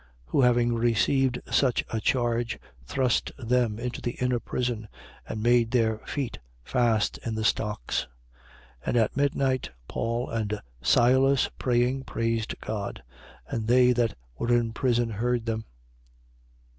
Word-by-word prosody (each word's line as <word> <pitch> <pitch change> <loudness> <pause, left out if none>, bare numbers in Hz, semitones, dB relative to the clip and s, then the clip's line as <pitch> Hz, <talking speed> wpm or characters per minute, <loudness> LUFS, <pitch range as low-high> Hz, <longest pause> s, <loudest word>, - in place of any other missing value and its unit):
16:24. - - -23
Who - - +3
having 120 -1 +4
received 120 +3 +2
such 130 -4 +2
a 110 - -1
charge, 120 0 0 0.3
thrust 130 - +1
them 120 -3 +1
into 120 +1 -4
the 120 - -2
inner 125 -1 0
prison 120 -3 -3 0.4
and 110 - -4
made 120 -1 +4
their 110 -3 +1
feet 125 -8 -3 0.2
fast 115 - +1
in 115 -2 -4
the 110 - -2
stocks. 105 - 0 0.8
16:25. - - -14
And - - +2
at 110 -2 +2
midnight, 135 -2 +1 0.2
Paul 115 +2 -2
and 105 -2 -2 0.2
Silas, 130 - +4
praying, 125 +2 +1
praised 115 -1 -1
God. 100 - -4 0.4
And 110 -1 -3
they 125 +1 +5
that 120 -3 +1 0.2
were 120 - 0
in 120 -2 +2
prison 120 -1 +1
heard 120 +2 -1
them. 110 -1 -2
120 Hz, 140 wpm, -27 LUFS, 115-125 Hz, 0.8 s, they